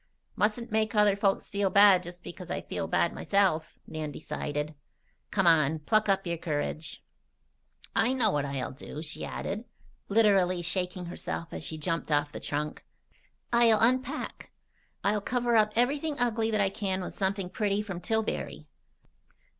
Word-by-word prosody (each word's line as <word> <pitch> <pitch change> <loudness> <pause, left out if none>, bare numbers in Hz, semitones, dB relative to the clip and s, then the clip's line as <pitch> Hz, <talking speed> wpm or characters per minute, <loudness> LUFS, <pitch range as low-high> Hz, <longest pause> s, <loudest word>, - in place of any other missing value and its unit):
"Mustn't 220 +3 0
make 220 0 +1
other 210 -1 +5
folks 200 -1 0
feel 200 -1 +1
bad 200 -2 +7
just 175 0 -10
because 180 0 -9
I - - -2
feel - - -4
bad - - +1
myself," 190 -6 +1
Nan 155 -1 -5
decided. 150 +1 -4 0.6
"Come 195 -2 +1
on! 160 -2 +5
Pluck 210 +8 +1
up 195 0 +2
your 170 -1 -2
courage! 155 -1 -3 0.9
"I 235 +3 +4
know 260 - +3
what 145 -1 0
I'll 140 -3 -3
do," 145 +3 -8
she 160 0 -6
added, 210 +4 -4 0.5
literally 195 -4 +3
shaking 180 +1 -2
herself 170 -1 -5
as - - -5
she 160 +2 -5
jumped 165 +1 -2
off 145 0 +2
the - - -6
trunk. 150 +1 -3 0.7
"I'll 230 -2 +5
unpack. 255 +3 0 0.5
I'll 205 +1 +1
cover 240 +1 0
up 215 -1 +4
everything 285 +5 +1
ugly 225 -2 +1
that 215 -1 +1
I 195 - +3
can 190 -2 -2
with - - -6
something 190 -1 -1
pretty 205 -1 0
from 195 -4 -6
Tillbury." 220 -8 -2
195 Hz, 155 wpm, -29 LUFS, 160-215 Hz, 0.9 s, bad